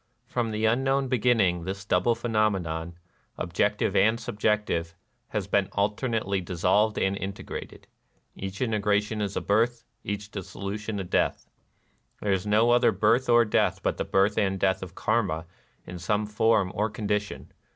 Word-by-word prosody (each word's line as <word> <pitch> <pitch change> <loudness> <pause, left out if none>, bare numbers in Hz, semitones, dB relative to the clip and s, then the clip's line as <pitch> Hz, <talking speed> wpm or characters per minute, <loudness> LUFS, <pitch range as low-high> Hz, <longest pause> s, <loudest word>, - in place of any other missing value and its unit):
From 120 -2 -2
the 110 0 -1
unknown 135 +4 +1
be 130 -2 +1
ginning, 100 -8 +2
this 100 +1 -5
double 100 +5 +2
phenomenon, 95 -8 -1 0.4
objective - - 0
and 110 +4 +4
subjective, 105 -8 -1 0.3
has 105 -3 -3
been 100 0 +1
alternately 105 -1 0
dissolved 100 +5 +1
and 95 +1 +1
integrated: 100 0 -7 0.5
each 95 +1 -6
integration 105 -1 0
is 100 -1 -2
a - - -1
birth; 115 +3 +1 0.2
each 105 +1 -5
dissolution 100 +2 -5
a - - -2
death. 90 - 0 0.7
There 105 - -1
is 95 +1 -2
no 110 +3 +4
other 120 -1 +5
birth 110 +6 +2
or 120 0 +6
death 105 - +1
but - - 0
the - - -1
birth 100 +2 +2
and 95 -2 0
death 95 0 +1
of 90 -1 -8
Karma 100 -8 0 0.4
in 90 -1 -8
some 105 +4 0
form 105 -2 +2
or 105 +2 0
condition. 105 -1 -3
105 Hz, 150 wpm, -27 LUFS, 95-110 Hz, 0.7 s, or